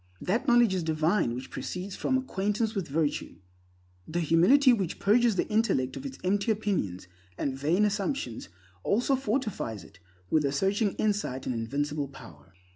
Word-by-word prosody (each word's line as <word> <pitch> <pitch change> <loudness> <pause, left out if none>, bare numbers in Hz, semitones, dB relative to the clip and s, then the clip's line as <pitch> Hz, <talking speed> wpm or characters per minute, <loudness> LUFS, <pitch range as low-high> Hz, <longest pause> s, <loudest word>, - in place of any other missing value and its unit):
That 210 +6 -1
knowledge 240 -4 +5
is 185 - 0
divine 160 - +1
which 130 +1 -7
proceeds 185 +2 -5
from 260 - +1
acquaintance 215 -3 -1
with 195 -6 -3
virtue. 150 +1 -1 0.7
The 175 +2 -1
humility 240 - +5
which 190 -7 -2
purges 225 +2 +3
the - - 0
intellect 210 - +1
of 275 - -5
its 270 - -9
empty 200 +4 +1
opinions 180 - -2 0.3
and 135 -2 -2
vain 160 +10 +2
assumptions 200 - -2 0.3
also 245 - +2
fortifies 215 - -2
it 95 - -17 0.3
with 155 - +3
a 140 - +1
searching 195 +7 +1
insight 205 -12 -1
and 125 - -1
invincible 140 +5 -2
power. 85 - -14
190 Hz, 155 wpm, -28 LUFS, 140-215 Hz, 0.7 s, knowledge